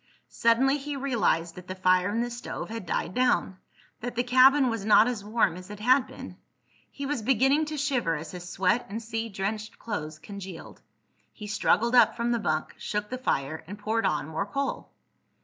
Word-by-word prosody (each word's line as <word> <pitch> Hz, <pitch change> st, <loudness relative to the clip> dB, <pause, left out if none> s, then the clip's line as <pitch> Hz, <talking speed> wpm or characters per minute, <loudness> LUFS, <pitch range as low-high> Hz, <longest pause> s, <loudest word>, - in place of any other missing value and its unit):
Suddenly 265 Hz, +5 st, +3 dB
he 290 Hz, +1 st, -5 dB
realized 235 Hz, -11 st, 0 dB
that 180 Hz, +1 st, -12 dB
the 185 Hz, -, -5 dB
fire 185 Hz, 0 st, +3 dB
in 225 Hz, +3 st, 0 dB
the 240 Hz, 0 st, -2 dB
stove 240 Hz, -2 st, -6 dB
had 225 Hz, -6 st, -6 dB
died 170 Hz, -, -2 dB
down—that 245 Hz, 0 st, -2 dB
the 245 Hz, -, +1 dB
cabin 260 Hz, +2 st, +6 dB
was 230 Hz, -4 st, -2 dB
not 215 Hz, +1 st, +6 dB
as 235 Hz, -5 st, -3 dB
warm 210 Hz, -5 st, +1 dB
as 185 Hz, +2 st, -10 dB
it 210 Hz, 0 st, -8 dB
had 255 Hz, +4 st, +4 dB
been. -, -, -10 dB, 0.5 s
He 280 Hz, -, -6 dB
was 280 Hz, -4 st, -2 dB
beginning 270 Hz, +6 st, +3 dB
to 305 Hz, 0 st, -4 dB
shiver 255 Hz, -, 0 dB
as 160 Hz, +1 st, -7 dB
his 180 Hz, -1 st, -8 dB
sweat 190 Hz, +6 st, +1 dB
and 215 Hz, +3 st, -4 dB
sea 225 Hz, 0 st, -4 dB
drenched 210 Hz, +2 st, -4 dB
clothes 155 Hz, -8 st, -5 dB
congealed. 190 Hz, 0 st, -9 dB, 0.5 s
He 210 Hz, -, -10 dB
struggled 215 Hz, +3 st, +1 dB
up 240 Hz, -3 st, +6 dB
from 235 Hz, 0 st, -1 dB
the 235 Hz, -, +1 dB
bunk, 155 Hz, -7 st, -1 dB
shook 210 Hz, +1 st, -3 dB
the 255 Hz, -, -3 dB
fire, 155 Hz, -, -2 dB
and 205 Hz, +3 st, -7 dB
poured 220 Hz, +2 st, 0 dB
on 150 Hz, -2 st, -1 dB
more 160 Hz, +5 st, -3 dB
coal. 275 Hz, +6 st, -3 dB
220 Hz, 190 wpm, -27 LUFS, 185-250 Hz, 0.5 s, cabin